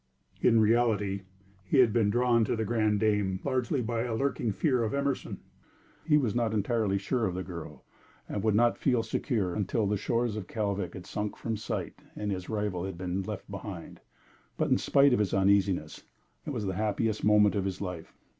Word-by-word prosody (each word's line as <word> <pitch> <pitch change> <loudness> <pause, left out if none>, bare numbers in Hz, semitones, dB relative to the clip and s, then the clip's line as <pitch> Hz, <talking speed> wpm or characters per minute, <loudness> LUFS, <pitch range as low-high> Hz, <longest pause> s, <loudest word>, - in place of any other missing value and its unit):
In 115 -2 +5
reality, 105 -3 +2 0.4
he 95 - 0
had 120 -5 +5
been 110 -4 +3
drawn 120 +1 +3
to - - 0
The 110 -1 -1
Grande 110 -2 +1
Dame 105 -3 +1
largely 130 -1 0
by 115 0 -1
a 120 -1 -2
lurking 135 -3 0
fear 130 - +1
of 110 +3 -1
Emerson. 140 -1 -2 0.7
He 150 -2 +5
was 125 -8 +1
not 115 -2 0
entirely 105 -1 +1
sure 110 +3 0
of 90 - -3
the 95 - -3
girl, 85 -6 -9 0.4
and 105 - -3
would 110 0 +2
not 120 +2 +3
feel 125 -4 +2
secure 105 - -1
until 105 +1 0
the 105 +1 0
shores 115 +1 -1
of 105 -4 -5
Kalvik 100 -4 -2
had 90 -2 -8
sunk 105 +2 -4
from 115 -1 -3
sight 110 - -4 0.2
and 105 -1 -3
his 90 -1 -4
rival 105 -5 -2
had 95 -3 -6
been 90 +1 -2
left 100 +1 -6
behind. 100 -3 -7 0.6
But - - 0
in - - +4
spite 140 -1 +4
of 125 - +2
his 105 -2 +1
uneasiness, 95 -5 +2 0.5
it - - -2
was 105 - -3
the 95 - -1
happiest 110 +2 -1
moment 105 -1 +5
of 100 -2 -1
his 95 -1 -3
life. 90 -4 -6
105 Hz, 195 wpm, -29 LUFS, 100-115 Hz, 0.7 s, In